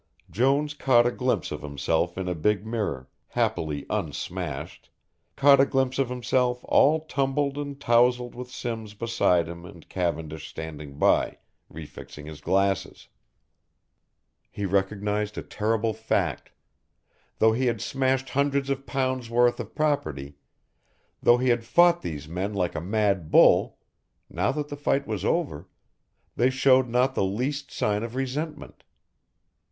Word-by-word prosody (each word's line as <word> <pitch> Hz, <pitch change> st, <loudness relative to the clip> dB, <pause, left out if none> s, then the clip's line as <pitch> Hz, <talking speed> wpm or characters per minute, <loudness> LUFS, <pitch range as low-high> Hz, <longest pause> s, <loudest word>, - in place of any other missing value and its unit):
Jones 140 Hz, +6 st, +1 dB
caught 130 Hz, -5 st, +4 dB
a 120 Hz, -, +2 dB
glimpse 125 Hz, -, -1 dB
of -, -, -5 dB
himself 75 Hz, +5 st, -1 dB
in 95 Hz, -1 st, -3 dB
a 90 Hz, -, 0 dB
big 100 Hz, +5 st, 0 dB
mirror, 105 Hz, -, -3 dB, 0.2 s
happily 75 Hz, -3 st, -1 dB
un 100 Hz, -8 st, -2 dB
smashed, 80 Hz, -2 st, -6 dB, 0.5 s
caught 140 Hz, 0 st, +6 dB
a 135 Hz, -, +6 dB
glimpse 130 Hz, 0 st, 0 dB
of 135 Hz, -3 st, +1 dB
himself 125 Hz, 0 st, 0 dB
all 155 Hz, +3 st, +4 dB
tumbled 140 Hz, -1 st, 0 dB
and 145 Hz, -1 st, -5 dB
towsled 120 Hz, -1 st, +3 dB
with 125 Hz, 0 st, -8 dB
Simms 115 Hz, -4 st, -5 dB
beside 105 Hz, -7 st, +1 dB
him 85 Hz, 0 st, -8 dB
and 85 Hz, -2 st, -13 dB
Cavendish 80 Hz, -4 st, -3 dB
standing 75 Hz, -3 st, -8 dB
by, -, -, +2 dB, 0.3 s
re 80 Hz, +1 st, -8 dB
fixing 75 Hz, 0 st, -11 dB
his 75 Hz, -1 st, -9 dB
glasses. 95 Hz, -1 st, 0 dB, 1.4 s
He 100 Hz, -, -4 dB
recognised 105 Hz, +2 st, -1 dB
a -, -, -4 dB
terrible 110 Hz, +1 st, -1 dB
fact; 110 Hz, +1 st, -1 dB, 0.9 s
though 110 Hz, -, +5 dB
he 130 Hz, +3 st, 0 dB
had 115 Hz, -2 st, 0 dB
smashed 130 Hz, +3 st, 0 dB
hundreds 140 Hz, 0 st, +1 dB
of 135 Hz, 0 st, -3 dB
pounds' 130 Hz, -3 st, -1 dB
worth 120 Hz, +1 st, +3 dB
of -, -, -7 dB
property, 80 Hz, -, -1 dB, 0.9 s
though 120 Hz, -, +5 dB
he 125 Hz, +1 st, +1 dB
had 120 Hz, -1 st, +2 dB
fought 175 Hz, +6 st, +4 dB
these 75 Hz, -3 st, -6 dB
men 95 Hz, +5 st, -3 dB
like 90 Hz, -3 st, 0 dB
a -, -, -4 dB
mad 100 Hz, -3 st, 0 dB
bull, -, -, +5 dB, 0.5 s
now 90 Hz, +4 st, 0 dB
that 150 Hz, 0 st, -4 dB
the 145 Hz, -, -5 dB
fight 140 Hz, -1 st, 0 dB
was 105 Hz, -4 st, -4 dB
over, 100 Hz, -, -1 dB, 0.7 s
they 125 Hz, +2 st, +3 dB
showed 130 Hz, -1 st, +3 dB
not 125 Hz, +3 st, +2 dB
the -, -, 0 dB
least 130 Hz, +9 st, -2 dB
sign 105 Hz, 0 st, -1 dB
of 115 Hz, +1 st, -6 dB
resentment. 140 Hz, +4 st, -4 dB
115 Hz, 145 wpm, -26 LUFS, 90-130 Hz, 1.4 s, caught